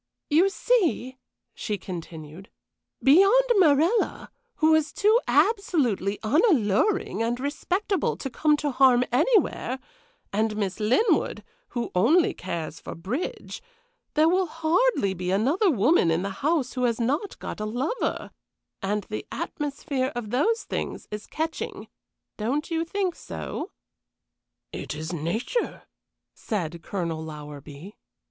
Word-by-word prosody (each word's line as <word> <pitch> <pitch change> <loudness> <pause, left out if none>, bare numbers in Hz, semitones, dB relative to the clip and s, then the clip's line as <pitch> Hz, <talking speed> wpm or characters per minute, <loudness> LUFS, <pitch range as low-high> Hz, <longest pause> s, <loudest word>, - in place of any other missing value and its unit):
"You 340 +6 +5
see," 360 - 0 0.3
she 210 -2 -3
continued, 170 -2 -8 0.5
"beyond 390 - +6
Morella, 340 +5 +3 0.2
who 315 0 +4
is 310 -2 +2
too 430 +3 +4
absolutely 280 - +2
unalluring 275 - +2
and 235 +2 0
respectable 360 +7 -1
to - - -4
come 300 +3 +2
to 295 -1 -1
harm 255 -1 +5
anywhere, 290 - +2 0.6
and 215 +1 0
Miss 200 -1 -2
Linwood, 245 - +2 0.3
who 235 - -2
only 290 - +4
cares 165 -4 -5
for - - -8
bridge, 215 - -5 0.5
there 310 +1 +5
will 370 +2 +2
hardly 325 - +1
be 180 0 -4
another 275 - +2
woman 245 - +3
in 165 +2 +1
the 200 - -3
house 295 -4 +1
who 250 -1 0
has 235 -1 0
not 290 - -1
got - - -6
a 215 - -2
lover, 260 - -2 0.5
and 205 +1 -1
the 215 - -5
atmosphere 280 -3 -3
of 225 -3 -5
those 445 - +1
things - - -4
is 210 0 -6
catching 320 +1 -4 0.5
don't 270 +10 -2
you 330 0 +1
think 375 +1 -1
so?" - - -6 1.0
"It - - -5
is 160 +3 -5
nature," 175 - -2 0.5
said 170 -6 -4
Colonel 170 -4 -3
Lowerby. 150 +3 -9
255 Hz, 125 wpm, -26 LUFS, 200-330 Hz, 1.0 s, beyond